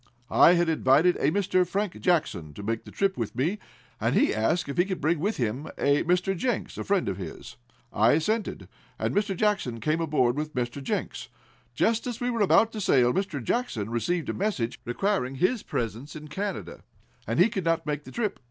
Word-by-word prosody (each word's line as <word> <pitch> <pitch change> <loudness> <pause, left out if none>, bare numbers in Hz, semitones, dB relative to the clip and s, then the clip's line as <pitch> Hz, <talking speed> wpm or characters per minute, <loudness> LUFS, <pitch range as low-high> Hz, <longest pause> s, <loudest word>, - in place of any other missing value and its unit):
I 175 - +7
had 175 -1 +2
invited 160 +2 +4
a 140 - +2
Mr. 185 +1 +2
Frank 195 +1 -3
Jackson 95 - 0
to 100 - -8
make 115 +2 -2
the - - -11
trip 195 -1 0
with 115 -2 -3
me, 165 - 0 0.4
and - - +1
he - - +3
asked 115 +12 0
if 140 - -5
he 175 - +5
could 190 -2 -3
bring 160 +2 +1
with 205 +7 -1
him 125 +5 -2
a 140 +1 +2
Mr. 180 +2 +1
Jenks, 240 +5 -2
a - - -2
friend 200 -2 +1
of 95 -2 -2
his. 85 -8 -8 0.4
I 110 +3 +4
assented, 210 +9 -1 0.3
and - - -1
Mr. 205 -2 0
Jackson 200 - 0
came 155 +6 0
aboard 140 -6 +2
with 150 -1 -4
Mr. 125 +2 -2
Jenks. 135 - -3 0.5
Just 230 - +1
as 240 -2 -4
we 245 0 -1
were 230 -2 -1
about 215 +3 +4
to 215 - -5
sail 125 -8 +4
Mr. 185 -8 -2
Jackson 115 - -2
received 165 +9 -1
a - - 0
message 180 - -2
requiring 135 0 -1
his 195 - +1
presence 115 +6 -4
in 150 0 -9
Canada, 140 - -4 0.5
and 115 +3 -1
he 180 - +7
could 195 -5 -4
not 165 -1 +1
make 150 -1 -2
the - - -11
trip." 215 -4 -2
165 Hz, 205 wpm, -27 LUFS, 125-195 Hz, 0.5 s, I